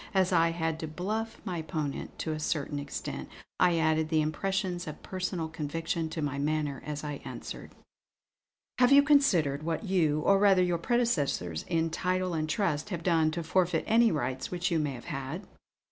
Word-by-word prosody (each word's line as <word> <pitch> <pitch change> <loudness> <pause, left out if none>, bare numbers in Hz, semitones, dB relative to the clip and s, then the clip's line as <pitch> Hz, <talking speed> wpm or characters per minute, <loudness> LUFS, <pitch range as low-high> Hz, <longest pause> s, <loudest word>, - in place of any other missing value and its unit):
As 190 -1 +3
I 165 -1 +4
had 160 -1 -2
to 160 - -4
'bluff' 210 +8 -3
my 175 -3 -2
opponent 155 -3 -4
to 160 - -3
a 155 - -3
certain 150 -2 -2
extent, 140 0 -5 0.3
I 175 -2 +4
added 160 -1 +2
the 155 -1 +3
impressions 180 +2 -2
of 155 - -8
personal 180 -3 -3
conviction 165 +1 -3
to 155 -1 -3
my 140 -1 -2
manner 150 -1 -1
as 150 0 -5
I 145 -2 -5
answered: - - -8 1.0
"Have 250 +1 +5
you 280 0 +8
considered 185 - +3
what 165 +6 -2
you, 165 -7 +2
or 195 +4 +4
rather 195 -2 +5
your 175 -2 +1
predecessors 155 - 0
in 165 -1 0
title 185 +1 0
and 155 -1 -1
trust, 160 0 0
have 170 -4 -4
done 165 -3 +3
to 165 +2 -3
forfeit 175 -1 +1
any 230 0 +4
rights 130 -3 -2
which 180 0 -1
you 165 - +2
may 150 -2 -1
have 120 - -9
had?" 135 +8 -5
165 Hz, 180 wpm, -29 LUFS, 155-185 Hz, 1.0 s, you